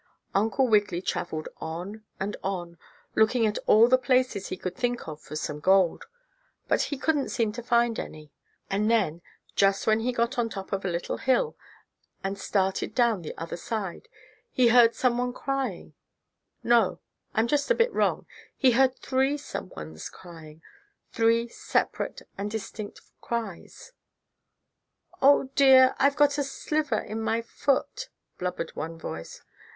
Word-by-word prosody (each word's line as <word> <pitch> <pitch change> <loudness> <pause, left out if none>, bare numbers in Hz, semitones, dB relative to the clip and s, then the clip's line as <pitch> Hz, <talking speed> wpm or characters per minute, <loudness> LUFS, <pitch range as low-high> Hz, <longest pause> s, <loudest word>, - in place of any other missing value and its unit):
Uncle 220 +6 +2
Wiggily 205 -6 +2
traveled 160 -3 -3
on 180 +7 -6 0.2
and 200 +2 -2
on, 175 -3 -4 0.3
looking 220 +2 +3
in 215 -1 +2
all 225 +2 +7
the 255 +1 +4
places 255 -5 +1
he 185 - -5
could 185 0 -5
think 245 -2 -2
of 155 -1 -7
for - - -9
some 150 -1 -4
gold, 190 +1 +3 0.6
but - - +2
he 285 - -2
couldn't 290 0 0
seem 230 -4 0
to 235 +3 -6
find 235 -1 +2
any. 155 -1 -8 0.4
And 210 +2 0
then, 190 -8 +1 0.3
just 195 0 +3
when 220 0 +3
he 240 +3 0
got 240 +2 -1
on 230 -1 +1
top 195 -2 -7
of 195 - -1
a - - -1
little 170 0 -3
hill, 360 - +1 0.7
and 195 +1 -2
started 190 -1 -1
down 235 -6 +3
the 155 - -8
other 165 +1 -5
side 195 -1 -5 0.4
he 250 -2 +4
heard 235 -1 +6
some 245 -2 +1
one 250 0 -1
crying 265 -9 -3 0.7
no, 235 -5 +3 0.4
I'm 220 - +3
just 290 - 0
a - - +4
bit 465 +1 +2
wrong, - - +1 0.3
he 260 -3 +5
heard 260 +2 +3
three 265 +2 0
some 285 -9 -6
ones 80 - -8
crying 165 -2 -13 0.5
three 230 0 +2
separate - - -2 0.2
and 205 +1 -2
distinct 215 -1 -6 0.2
cries. 230 - -5 1.3
"Oh, 275 -1 +5
dear, 265 -2 +7
I've 280 +1 +4
got 290 -1 +3
a - - +2
sliver 280 -2 -1
in 220 +2 -4
my 225 +1 0
foot!" 275 - -1 0.3
blubbered 180 -2 -4
one 165 +1 -5
voice. 80 - -8
225 Hz, 155 wpm, -27 LUFS, 185-255 Hz, 1.3 s, all